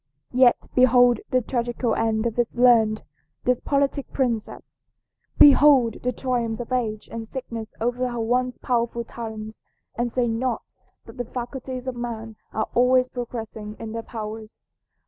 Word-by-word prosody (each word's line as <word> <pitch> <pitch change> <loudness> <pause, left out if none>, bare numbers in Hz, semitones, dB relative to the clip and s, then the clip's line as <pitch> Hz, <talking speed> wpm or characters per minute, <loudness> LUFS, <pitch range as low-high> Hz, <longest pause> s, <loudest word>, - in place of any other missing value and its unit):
Yet 250 -1 +4
behold 245 -2 +5
the 255 -2 +2
tragical 240 -1 -1
end 220 0 0
of 230 -2 -1
this 240 -1 -1
learned, 230 -3 +4 0.4
this 250 0 +2
politic 280 -1 0
princess! 235 -5 -3 0.6
Behold 275 -5 +6
the 250 - 0
triumphs 240 -3 -2
of 240 +1 -6
age 220 -4 -1
and 225 -1 -6
sickness 230 -3 -7
over 245 +2 0
her 240 -1 -4
once 250 +2 0
powerful 235 -1 -1
talents, 220 -2 -8 0.3
and 240 0 -1
say 245 0 +1
not 235 +1 -2 0.3
that - - -13
the 245 - -3
faculties 255 +1 -6
of 260 -1 -3
man 225 -2 -5 0.2
are 220 - -1
always 255 +1 +4
progressing 225 -4 -6
in 225 -1 -7
their 230 +1 -4
powers. 220 -1 -7
240 Hz, 145 wpm, -24 LUFS, 225-250 Hz, 0.6 s, Behold